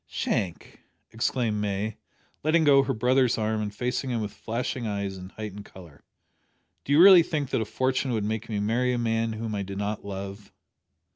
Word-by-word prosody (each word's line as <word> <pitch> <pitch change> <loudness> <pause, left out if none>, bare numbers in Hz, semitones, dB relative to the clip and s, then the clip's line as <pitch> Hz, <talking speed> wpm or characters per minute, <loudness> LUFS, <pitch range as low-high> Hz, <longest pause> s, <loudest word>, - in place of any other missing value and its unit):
"Shank!" 90 -4 -3 0.3
exclaimed 115 -2 -1
May, 105 +1 -2 0.4
letting 160 +2 +3
go 140 -2 +6
her 135 - -1
brother's 125 +2 +2
arm 110 0 -1
and 105 -1 -3
facing 125 +5 -2
him 120 -2 -1
with 105 -2 -4
flashing 120 +1 -3
eyes 100 -2 -3
and 95 0 -10
heightened 105 -2 -7
colour, 85 -6 -14 0.8
"do - - -5
you 145 - +5
really 185 -1 +10
think 150 -4 -3
that - - +1
a - - -1
fortune 130 +3 -1
would 110 -2 -1
make 110 +1 -3
me 105 -2 -1
marry 120 +5 +1
a - - 0
man 115 -1 0
whom 110 0 -4
I 100 - -2
did 100 0 -6
not 105 +1 -3
love?" 100 0 -7
110 Hz, 190 wpm, -26 LUFS, 100-125 Hz, 0.8 s, really